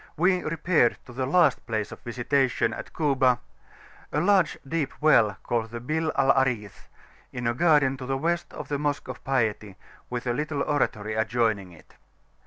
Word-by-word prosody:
we 180 +2 +3
repaired 160 -6 +1
to 125 - -12
the 130 +1 -2
last 175 +6 +3
place 110 -3 -2
of - - -9
visitation 120 -1 0
at - - -8
Kuba 130 -5 +2 0.7
a 150 - 0
large 185 -1 +3
deep 150 -1 -3
well 115 -10 +4
called 115 -1 -1
the 120 +1 -6
Bir 155 +6 -1
al 135 0 +4
Aris, 125 -7 -1 0.4
in 125 -1 -5
a 120 - +2
garden 145 -2 +3
to 130 -1 -7
the 135 0 0
West 170 +4 -1
of - - -8
the 145 -1 -2
Mosque 145 -1 -2
of 130 - -8
Piety, 110 -6 -1 0.3
with 125 0 -4
a 120 - 0
little 150 +1 -2
oratory 110 -8 -1
adjoining 110 -3 0
it. 85 - -18
130 Hz, 175 wpm, -26 LUFS, 115-150 Hz, 0.7 s, well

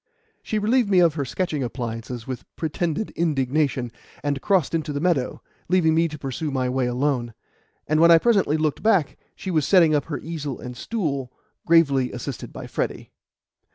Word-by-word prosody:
She 215 - -2
relieved 220 +2 +2
me 190 - +3
of 170 -3 +5
her 145 -2 -2
sketching 150 +3 -2
appliances 120 -1 -5
with 130 -2 -5
pretended 165 +4 -2
indignation, 140 -5 0 0.3
and 140 -2 -1
crossed 190 -8 +2
into 160 -2 -1
the 145 - -2
meadow, 155 -6 0 0.3
leaving 175 -3 +3
me 165 +1 +3
to 150 -1 -7
pursue 135 +3 -4
my 130 -2 -1
way 130 -1 0
alone; 125 -2 -1 0.5
and 155 0 +1
when 170 +1 +6
I 165 - +9
presently 195 -6 +2
looked 155 -2 -1
back, 200 -9 +2 0.2
she 190 - -5
was 155 -3 +2
setting 170 -5 +5
up 145 - +1
her 155 - -4
easel 150 -5 -5
and 125 0 -7
stool, 140 - -3 0.4
gravely 140 -6 +4
assisted 125 +1 -6
by - - -8
Freddy. - - -4
150 Hz, 175 wpm, -23 LUFS, 130-170 Hz, 0.5 s, I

